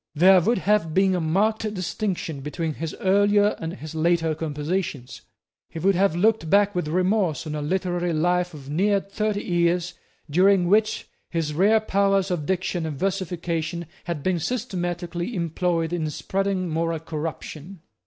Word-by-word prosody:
There 185 +4 +6
would 230 +8 +2
have 190 -5 +1
been 190 0 +4
a 180 - 0
marked 210 +7 +1
distinction 180 -4 -3
between 155 +3 -3
his 160 +1 -5
earlier 205 +2 +3
and 165 +1 -4
his 155 -3 -9
later 165 0 +1
compositions. 150 -5 -3 0.5
He - - -9
would 195 +4 +3
have 190 -2 +2
looked 210 -2 +2
back 205 +2 +4
with 175 -3 -2
remorse 180 -1 +1
on 155 - -4
a 150 - -3
literary 175 +2 -1
life 175 +2 +1
of 140 -2 -11
near 195 +7 +2
thirty 205 +1 -2
years, 175 0 +1 0.3
during 185 +4 +4
which 215 +3 +2 0.2
his 165 -3 -2
rare 205 +7 +4
powers 195 -2 +1
of 155 -5 -2
diction 185 -3 -1
and 150 -3 -5
versification 170 -2 -2 0.2
had 165 -5 -4
been 185 -2 +1
systematically 175 -2 -3
employed 170 -1 -1
in 160 -3 -1
spreading 190 +4 -1
moral 165 0 -1
corruption. 160 +2 -6
175 Hz, 155 wpm, -24 LUFS, 160-195 Hz, 0.5 s, There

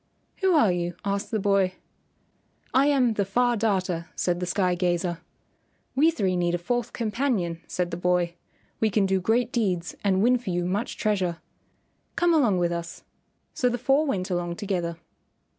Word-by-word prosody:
"Who 380 -3 +2
are 225 -11 +5
you?" 175 -1 -2
asked 200 0 -1
the 220 - 0
boy. 195 -2 +2 1.0
"I 270 +2 +4
am 260 -5 +3
the 205 - 0
Far 240 +5 +1
Darter," 185 -6 -1
said 175 -1 0
the 180 - -3
sky 180 -1 +1
gazer. 175 -1 0 0.7
"We 300 +5 +4
three 195 - 0
need 175 -1 +1
a - - 0
fourth 240 +7 -2
companion," 215 -8 -1
said 180 -1 -2
the 170 - -3
boy. 180 -1 +1 0.5
"We 220 - +2
can 205 -1 +2
do 190 -1 +1
great 235 +5 +1
deeds 185 -7 -1
and 195 -1 +2
win 250 +1 +4
for 235 - -6
you 175 -1 -1
much 200 +5 -2
treasure. 190 -6 0 0.8
Come 345 0 +3
along 245 - +3
with 175 -1 +1
us." 170 0 -5 0.5
So 250 - +1
the 240 - -1
four 275 +5 +2
went 190 -7 -2
along 175 -1 -1
together. 175 -4 -2
195 Hz, 175 wpm, -26 LUFS, 175-235 Hz, 1.0 s, are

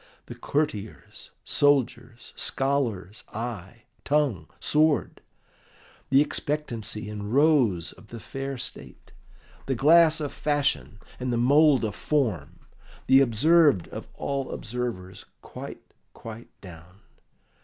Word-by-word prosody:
"The - - -8
courtier's, 125 -8 -4
soldier's, 125 -4 0
scholar's 115 -8 -2
eye, 115 -1 -6 0.2
tongue, 145 - 0
sword; 155 0 +1 0.9
the 135 +1 +5
expectancy 145 -8 -3
and 105 0 -6
rose 130 - +3
of 105 - -18
the 115 - -9
fair 135 +3 -6
state, - - -9 0.5
the 135 - 0
glass 160 +4 +5
of 145 -2 -4
fashion, 145 -7 -1 0.2
and 125 0 -2
the 120 - 0
mould 140 +1 +4
of 105 - -3
form, 90 - -2 0.4
the 135 +1 +6
observed 140 - +4
of - - -8
all 140 -1 -3
observers 110 -6 -5 0.2
quite, - - -9 0.3
quite 115 +1 -10
down! 90 +1 -14
125 Hz, 110 wpm, -26 LUFS, 105-145 Hz, 0.9 s, the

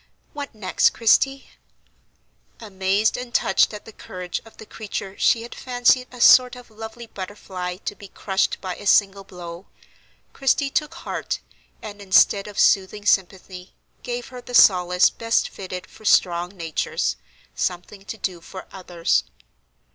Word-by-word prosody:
What 285 -4 -7
next, 190 -4 +2
Christie?" 270 +4 +2 1.1
Amazed 200 0 0
and 250 -1 -7
touched 190 - +2
at 210 -1 -9
the 225 - -11
courage 180 -3 -6
of 225 - -17
the 220 - -11
creature 200 -3 -6
she 230 - +3
had 235 - -9
fancied 250 0 +2
a 250 - -12
sort 250 +1 +7
of 245 -2 -14
lovely 225 +2 -9
butterfly 185 -3 -7
to - - -2
be 200 - -12
crushed 190 0 -1
by 185 -2 -5
a 205 - -7
single 195 0 +3
blow, 175 -1 -10 0.7
Christie 275 +1 +1
took 300 +1 -1
heart, - - -4 0.4
and, 205 -2 -8
instead 195 +1 +4
of 205 - -10
soothing 200 +2 +2
sympathy, 185 -1 -1 0.3
gave 245 0 -5
her 250 -1 -9
the 245 - -6
solace 180 -3 +5
best 230 0 0
fitted 185 -1 -7
for 215 - -18
strong 175 -4 +3
natures, 155 - -2 0.4
something 180 +3 -4
to 200 +4 -7
do 185 -4 -4
for 185 +2 -10
others. 175 -3 -1
200 Hz, 145 wpm, -22 LUFS, 185-230 Hz, 1.1 s, sort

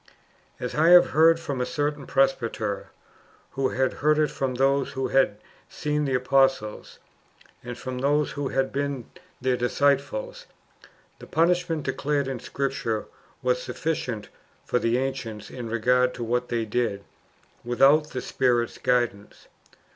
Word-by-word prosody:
As 125 - -4
I 160 +2 +3
have 180 0 +7
heard 165 +2 +5
from 140 -6 -3
a - - +2
certain 145 -3 -2
presbyter,^ 115 - 0 0.6
who 135 -1 0
had 130 0 0
heard 150 +1 +4
it 155 -1 +2
from 130 -2 -2
those 135 +1 +1
who 135 0 -2
had 135 -6 +2 0.3
seen 150 0 -1
the 135 -2 0
apostles, 130 -4 +1 0.7
and 120 0 -7
from 130 0 -5
those 145 +2 +1
who 145 -1 -3
had 135 0 -1
been 140 -3 -2 0.4
their 130 0 +2
disciples, 140 0 0 0.7
the - - -11
punishment 165 -1 +1
[declared] 140 +1 -1
in 135 -2 -4
Scripture 130 -5 -2 0.4
was 125 0 +1
sufficient 125 -10 -3 0.4
for 125 - +1
the 115 +1 +1
ancients 125 -5 -4
in 120 -3 -6
regard 125 +2 +2
to 120 - -5
what 125 +2 -1
they 115 -1 -1
did 110 -3 -1 0.6
without 140 +5 +4
the 125 - -4
Spirit's 120 -3 0
guidance. 120 -5 -1
130 Hz, 140 wpm, -25 LUFS, 120-145 Hz, 0.7 s, have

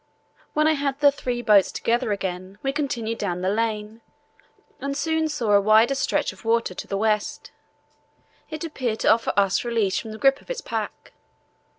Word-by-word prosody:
When 305 0 +2
I - - +5
had 280 -2 -2
the 285 -1 +6
three 245 -3 -4
boats 205 -4 +5
together 235 0 0
again 190 -1 -4
we 270 0 0
continued 240 -6 -2
down 180 -3 -2
the 185 +1 0
lane, 220 0 -2 0.8
and 275 0 -3
soon 320 +2 0
saw 240 -8 -1
a 200 -1 +6
wider 220 +5 +5
stretch 270 - 0
of - - -18
water 230 -3 +1
to - - -7
the 195 - -2
west; 210 0 -1 1.0
it 310 0 -6
appeared 255 -9 -3
to - - +5
offer 225 0 -1
us 195 -1 +2
release 225 -5 0
from 220 - -8
the 215 - -7
grip 270 +3 +3
of - - -23
the - - -4
pack. - - -5
230 Hz, 185 wpm, -24 LUFS, 210-275 Hz, 1.0 s, the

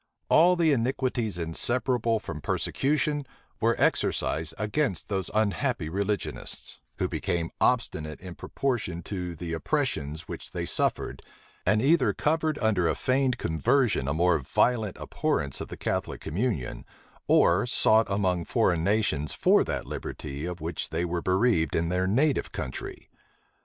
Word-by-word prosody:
All 175 +3 +6
the 165 -3 +3
iniquities 125 -4 -1
inseparable 115 - 0
from 75 -7 -7
persecution 145 - 0 0.4
were - - +2
exercised 80 0 +1
against 105 - -1
those 95 -3 -1
unhappy 110 - 0
religionists; 100 +2 -3 0.2
who - - 0
became 85 -2 -2
obstinate 80 -11 0
in 90 -1 -8
proportion 105 -8 -2
to 90 -3 -4
the 85 +1 -5
oppressions 80 - -2
which - - -7
they - - -2
suffered, - - -1 0.5
and 105 +3 +3
either 150 -1 +4
covered 155 0 0
under 95 -6 +2
a - - +1
feigned 130 -1 +1
conversion 115 - +1
a 70 - +1
more 90 0 +3
violent 110 - +1
abhorrence 70 -2 -1
of - - -5
the - - -8
Catholic - - -2
communion, 85 - -2 0.4
or 90 +7 +4
sought 110 -2 +4
among 95 -4 0
foreign 85 -2 +1
nations 95 -8 +1
for - - +4
that - - -3
liberty 70 +3 -6
of 90 0 -5
which 80 +1 -4
they 85 +2 -1
were 85 0 -2
bereaved 95 - +2
in 85 0 +1
their 90 +1 +1
native 135 +8 +1
country. 65 - -6
100 Hz, 140 wpm, -27 LUFS, 85-125 Hz, 0.5 s, All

